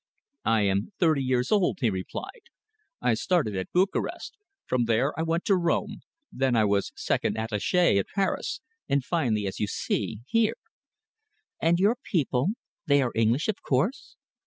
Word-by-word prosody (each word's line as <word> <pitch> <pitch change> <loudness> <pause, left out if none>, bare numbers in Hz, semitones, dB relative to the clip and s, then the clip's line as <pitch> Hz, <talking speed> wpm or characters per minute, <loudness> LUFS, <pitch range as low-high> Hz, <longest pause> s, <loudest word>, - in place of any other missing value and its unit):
"I 115 -1 +3
am 100 - 0
thirty 160 -5 +3
years 130 -1 0
old," 200 -3 +2
he 115 -4 +2
replied. 420 - -6 0.5
"I - - +3
started 160 - 0
at 95 0 -4
Bukarest. 190 +2 -1 0.3
From 125 -2 +1
there 115 +5 +1
I - - -2
went 165 +1 -1
to 200 - +4
Rome. 170 -2 0 0.3
Then 130 -2 +1
I 110 -2 +4
was 100 -1 +1
second - - -1
attaché 110 - +2
at 95 - -2
Paris, 195 -2 -1 0.3
and 140 -1 +2
finally, 120 - 0
as 95 - -4
you 105 - 0
see, 110 +1 -2
here." 225 - +1 1.0
"And 170 +1 +3
your 205 +6 +3
people 140 - 0 0.4
they 140 -1 +4
are 125 - -1
English, 115 +6 +2
of 215 - -2
course?" 195 - -1
135 Hz, 160 wpm, -27 LUFS, 110-180 Hz, 1.0 s, to